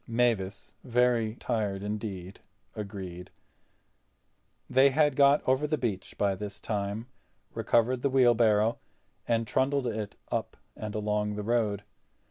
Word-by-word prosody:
Mavis, 115 Hz, -5 st, 0 dB
very 120 Hz, -3 st, +2 dB
tired 105 Hz, -5 st, -2 dB
indeed, 100 Hz, -3 st, -5 dB, 0.4 s
agreed. 95 Hz, -4 st, -7 dB, 1.4 s
They 135 Hz, +2 st, +5 dB
had 145 Hz, 0 st, +2 dB
got 140 Hz, +1 st, +4 dB
over 130 Hz, +3 st, +2 dB
the 155 Hz, +1 st, 0 dB
beach 110 Hz, -8 st, -3 dB
by 100 Hz, -1 st, +2 dB
this 100 Hz, +1 st, -6 dB
time, 105 Hz, +1 st, -3 dB, 0.5 s
recovered 120 Hz, +2 st, +2 dB
the 140 Hz, -, +1 dB
wheelbarrow, 115 Hz, -4 st, +4 dB, 0.5 s
and 115 Hz, -1 st, +1 dB
trundled 135 Hz, +3 st, +1 dB
it 110 Hz, -3 st, -3 dB, 0.2 s
up -, -, -2 dB, 0.2 s
and 105 Hz, -1 st, -6 dB
along 105 Hz, 0 st, -1 dB
the 105 Hz, -, -4 dB
road. 105 Hz, -3 st, 0 dB
110 Hz, 120 wpm, -29 LUFS, 105-125 Hz, 1.4 s, They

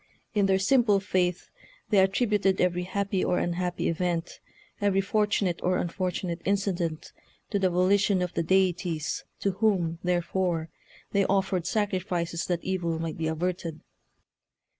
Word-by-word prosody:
In 205 Hz, -2 st, +3 dB
their 190 Hz, 0 st, +3 dB
simple 210 Hz, 0 st, +3 dB
faith 180 Hz, -2 st, -1 dB, 0.4 s
they 205 Hz, -, +5 dB
attributed 195 Hz, 0 st, +2 dB
every 180 Hz, 0 st, +1 dB
happy 195 Hz, 0 st, -1 dB
or 180 Hz, -, +1 dB
unhappy 175 Hz, +1 st, -1 dB
event, 170 Hz, 0 st, -2 dB, 0.4 s
every 200 Hz, -1 st, +3 dB
fortunate 200 Hz, -3 st, +1 dB
or 180 Hz, 0 st, +1 dB
unfortunate 180 Hz, -1 st, -2 dB
incident, 185 Hz, -5 st, -1 dB, 0.4 s
to 200 Hz, -, +1 dB
the 190 Hz, -1 st, +3 dB
volition 185 Hz, +1 st, +3 dB
of 180 Hz, -, -4 dB
the -, -, 0 dB
deities, 180 Hz, -2 st, 0 dB, 0.2 s
to 200 Hz, -, +1 dB
whom, 185 Hz, -5 st, +1 dB
therefore, 175 Hz, -2 st, 0 dB, 0.4 s
they 200 Hz, -1 st, +3 dB
offered 190 Hz, -2 st, 0 dB
sacrifices 180 Hz, -5 st, -1 dB
that 175 Hz, -2 st, -1 dB
evil 180 Hz, -3 st, -1 dB
might 165 Hz, 0 st, -4 dB
be 160 Hz, -, 0 dB
averted." 165 Hz, 0 st, -3 dB
185 Hz, 135 wpm, -27 LUFS, 170-195 Hz, 0.4 s, they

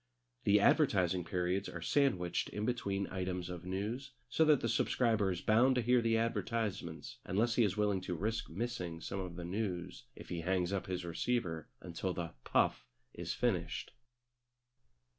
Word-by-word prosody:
The 105 Hz, +1 st, +6 dB
advertising 95 Hz, -, +3 dB
periods 90 Hz, +1 st, -1 dB
are 85 Hz, -, -6 dB
sandwiched 90 Hz, -, +1 dB
in 105 Hz, +1 st, -3 dB
between 100 Hz, -5 st, -1 dB
items 90 Hz, -1 st, -3 dB
of 90 Hz, 0 st, -7 dB
news, 110 Hz, +9 st, -3 dB, 0.2 s
so 160 Hz, -, +3 dB
that 150 Hz, -3 st, +5 dB
the -, -, 0 dB
subscriber 110 Hz, -5 st, +2 dB
is 90 Hz, -2 st, -2 dB
bound 120 Hz, +5 st, +4 dB
to 125 Hz, -, +2 dB
hear 125 Hz, +1 st, +4 dB
the 115 Hz, -1 st, +2 dB
advertisements 105 Hz, -8 st, -2 dB
unless 115 Hz, +5 st, +1 dB
he 120 Hz, -, +4 dB
is 100 Hz, -3 st, +1 dB
willing 105 Hz, -3 st, +2 dB
to 90 Hz, -1 st, -3 dB
risk 110 Hz, +6 st, -2 dB
missing 90 Hz, -3 st, -3 dB
some 95 Hz, -, -4 dB
of 90 Hz, -2 st, -5 dB
the 90 Hz, -1 st, -5 dB
news 90 Hz, -, -3 dB
if -, -, -11 dB
he 85 Hz, -1 st, -3 dB
hangs 90 Hz, +1 st, 0 dB
up 100 Hz, -, -2 dB
his 90 Hz, -1 st, -3 dB
receiver 85 Hz, -2 st, -1 dB
until 90 Hz, +1 st, -3 dB
the 85 Hz, -1 st, -4 dB
"puff" -, -, +1 dB, 0.3 s
is -, -, -4 dB
finished. -, -, -1 dB
95 Hz, 165 wpm, -34 LUFS, 90-115 Hz, 0.3 s, The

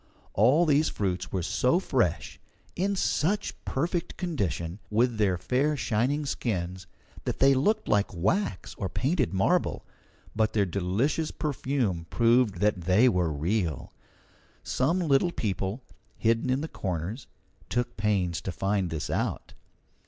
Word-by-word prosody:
All 130 Hz, -, +4 dB
these 150 Hz, 0 st, +3 dB
fruits 95 Hz, -3 st, -2 dB
were 95 Hz, -2 st, -1 dB
so 120 Hz, -, +2 dB
fresh, 120 Hz, -, -1 dB, 0.4 s
in 200 Hz, +2 st, 0 dB
such 195 Hz, +2 st, 0 dB
perfect 170 Hz, +5 st, -2 dB
condition, 100 Hz, -, -2 dB
with 115 Hz, +1 st, +1 dB
their 95 Hz, -4 st, +2 dB
fair 140 Hz, -, 0 dB
shining 125 Hz, +6 st, 0 dB
skins, 95 Hz, -8 st, -3 dB, 0.4 s
that -, -, -2 dB
they 135 Hz, +1 st, +5 dB
looked 150 Hz, +12 st, +1 dB
like 105 Hz, -1 st, +2 dB
wax 100 Hz, -, -1 dB
or 95 Hz, -, -2 dB
painted 130 Hz, -, 0 dB
marble, 95 Hz, 0 st, +1 dB, 0.5 s
but 110 Hz, 0 st, +1 dB
their 105 Hz, -2 st, +3 dB
delicious 100 Hz, -, 0 dB
perfume 130 Hz, -, -2 dB
proved 115 Hz, -5 st, +3 dB
that 105 Hz, -3 st, +2 dB
they 100 Hz, +8 st, +5 dB
were 90 Hz, -8 st, +2 dB
real. 85 Hz, +2 st, -2 dB, 0.7 s
Some 135 Hz, +8 st, +1 dB
little 160 Hz, +1 st, +3 dB
people, 100 Hz, -, -3 dB, 0.3 s
hidden 115 Hz, +3 st, +1 dB
in 130 Hz, +2 st, +1 dB
the 160 Hz, -, -3 dB
corners, 95 Hz, -, -4 dB, 0.4 s
took 120 Hz, 0 st, -1 dB
pains 100 Hz, -5 st, 0 dB
to 95 Hz, -, -4 dB
find 95 Hz, 0 st, 0 dB
this 80 Hz, -2 st, -3 dB
out. -, -, -2 dB
110 Hz, 135 wpm, -27 LUFS, 95-140 Hz, 0.7 s, they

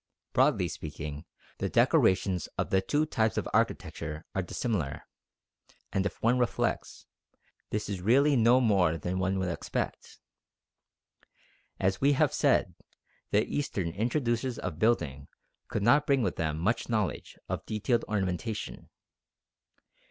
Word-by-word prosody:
Broadly -, -, +3 dB
speaking, 75 Hz, -1 st, -6 dB, 0.3 s
the -, -, -1 dB
decorations 95 Hz, -3 st, +3 dB
of -, -, -2 dB
the 95 Hz, -, +4 dB
two 150 Hz, +9 st, +1 dB
types 110 Hz, -7 st, 0 dB
of -, -, -1 dB
architecture 75 Hz, +2 st, -1 dB
are 95 Hz, -, 0 dB
dissimilar; 90 Hz, -, -2 dB, 0.9 s
and 95 Hz, +1 st, +1 dB
if -, -, -9 dB
one 120 Hz, +2 st, +3 dB
reflects, 120 Hz, -1 st, -1 dB, 0.6 s
this 105 Hz, 0 st, -2 dB
is 100 Hz, -3 st, -4 dB
really 140 Hz, +8 st, +4 dB
no 120 Hz, +1 st, +5 dB
more 95 Hz, -9 st, +3 dB
than 90 Hz, +4 st, -3 dB
one 95 Hz, +1 st, 0 dB
would 95 Hz, -1 st, -1 dB
expect. 85 Hz, -, -4 dB, 1.6 s
As 95 Hz, 0 st, 0 dB
we 140 Hz, +1 st, +5 dB
have -, -, +2 dB
said, -, -, +2 dB, 0.6 s
the 105 Hz, +1 st, +3 dB
Eastern 100 Hz, -12 st, -2 dB
introducers 120 Hz, -, -1 dB
of 85 Hz, -4 st, -5 dB
building 75 Hz, -, +1 dB, 0.4 s
could 105 Hz, -, -2 dB
not 145 Hz, +6 st, +4 dB
bring 135 Hz, -3 st, +3 dB
with 95 Hz, -, -1 dB
them 80 Hz, -2 st, -1 dB
much 105 Hz, +11 st, 0 dB
knowledge 105 Hz, -, -2 dB
of -, -, -3 dB
detailed 110 Hz, +3 st, 0 dB
ornamentation. 95 Hz, 0 st, -3 dB
100 Hz, 130 wpm, -29 LUFS, 90-120 Hz, 1.6 s, no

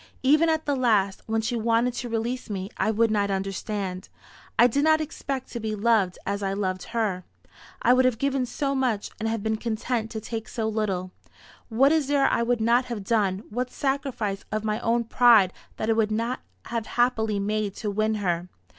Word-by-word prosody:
Even 305 Hz, +5 st, +5 dB
at 315 Hz, 0 st, 0 dB
the 285 Hz, -, +1 dB
last, 210 Hz, -7 st, +2 dB
when 225 Hz, 0 st, 0 dB
she 235 Hz, +2 st, -2 dB
wanted 230 Hz, +2 st, +1 dB
to 245 Hz, 0 st, -5 dB
release 230 Hz, +2 st, -2 dB
me, 195 Hz, 0 st, -4 dB
I -, -, 0 dB
would 220 Hz, +1 st, +2 dB
not 205 Hz, -1 st, +1 dB
understand. 195 Hz, -1 st, -3 dB, 0.5 s
I 240 Hz, -, +7 dB
did 275 Hz, +4 st, +2 dB
not 315 Hz, 0 st, +5 dB
expect 275 Hz, -4 st, -4 dB
to 235 Hz, -, -4 dB
be 215 Hz, -1 st, -3 dB
loved 210 Hz, -4 st, +2 dB
as 200 Hz, +1 st, -2 dB
I 195 Hz, -1 st, -1 dB
loved 185 Hz, -2 st, -2 dB
her. 215 Hz, -6 st, -1 dB, 0.6 s
I 245 Hz, -, +6 dB
would 255 Hz, 0 st, +4 dB
have 255 Hz, -3 st, +2 dB
given 270 Hz, 0 st, 0 dB
so 275 Hz, +2 st, -2 dB
much, 250 Hz, -6 st, -1 dB
and 225 Hz, -1 st, -2 dB
been 220 Hz, 0 st, 0 dB
content 225 Hz, 0 st, -2 dB
to 220 Hz, -, -5 dB
take 225 Hz, 0 st, -5 dB
so 225 Hz, -2 st, -2 dB
little. 200 Hz, -4 st, -2 dB, 0.6 s
What 265 Hz, +5 st, +4 dB
is 315 Hz, -4 st, +2 dB
there 280 Hz, -1 st, +3 dB
I -, -, +2 dB
would 235 Hz, 0 st, +1 dB
not 240 Hz, +3 st, +3 dB
have 235 Hz, -5 st, -5 dB
done 200 Hz, -2 st, +1 dB
what 250 Hz, +3 st, -2 dB
sacrifice 255 Hz, -8 st, -2 dB
of 215 Hz, 0 st, -1 dB
my 215 Hz, 0 st, -1 dB
own 235 Hz, +1 st, +1 dB
pride 230 Hz, -5 st, +5 dB, 0.2 s
that 220 Hz, -, -2 dB
I 225 Hz, -, +4 dB
would 220 Hz, -1 st, +2 dB
not 230 Hz, +4 st, -1 dB, 0.3 s
have 230 Hz, -2 st, -3 dB
happily 220 Hz, -4 st, +2 dB
made 210 Hz, 0 st, -1 dB
to 210 Hz, -3 st, -3 dB
win 215 Hz, +2 st, +1 dB
her! 180 Hz, -3 st, -1 dB
225 Hz, 200 wpm, -25 LUFS, 205-245 Hz, 0.6 s, I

